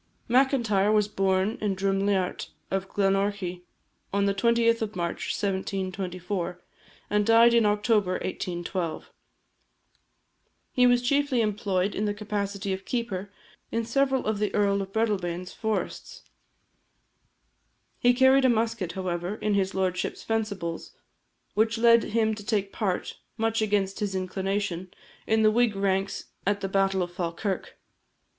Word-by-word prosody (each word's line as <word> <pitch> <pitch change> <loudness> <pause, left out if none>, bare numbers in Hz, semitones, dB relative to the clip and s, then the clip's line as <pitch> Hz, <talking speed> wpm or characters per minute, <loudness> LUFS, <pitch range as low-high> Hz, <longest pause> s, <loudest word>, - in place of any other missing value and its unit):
Macintyre 235 -6 +3
was 210 -1 +3
born 195 +1 0
in 205 -2 0
Druimliart 195 -1 0 0.2
of 195 0 -2
Glenorchy 195 -2 0 0.5
on 200 0 +1
the 200 - +2
20th 230 +2 +2
of 215 -2 -3
March 170 -1 -3
1724, 185 -2 -3 0.5
and 210 0 +3
died 230 +2 +6
in 230 -2 +4
October 210 -2 +2
1812. 175 -2 -4 1.6
He 250 -1 +4
was 245 0 +3
chiefly 280 -1 +2
employed 200 -2 0
in 210 - -1
the 205 0 -1
capacity 200 -1 -3
of 190 +1 -5
keeper 205 -5 -3 0.4
in 230 0 -1
several 265 +2 +1
of 215 -1 -1
the 210 -1 0
Earl 200 -1 +2
of 195 0 -6
Breadalbane's 185 -5 -1
forests. 220 -1 -4 1.8
He 245 0 +4
carried 260 +1 +5
a - - +6
musket, 225 -6 0
however, 180 0 -3
in 215 -1 -1
his 195 -1 0
lordship's 185 -1 -1
fencibles; 200 -7 -3 0.6
which 220 +2 +2
led 230 0 +5
him 220 0 +1
to 210 -1 -7
take 200 -2 -1
part, 195 -5 -2 0.2
much 225 0 0
against 200 -2 0
his 205 -2 -2
inclination, 190 -1 -2 0.4
in 220 0 +3
the 215 - +6
Whig 235 -1 +2
ranks 195 0 -1 0.2
at 205 0 +1
the 195 - -1
battle 195 -1 +2
of 175 0 -7
Falkirk. 180 +3 -3
200 Hz, 135 wpm, -27 LUFS, 190-225 Hz, 1.8 s, died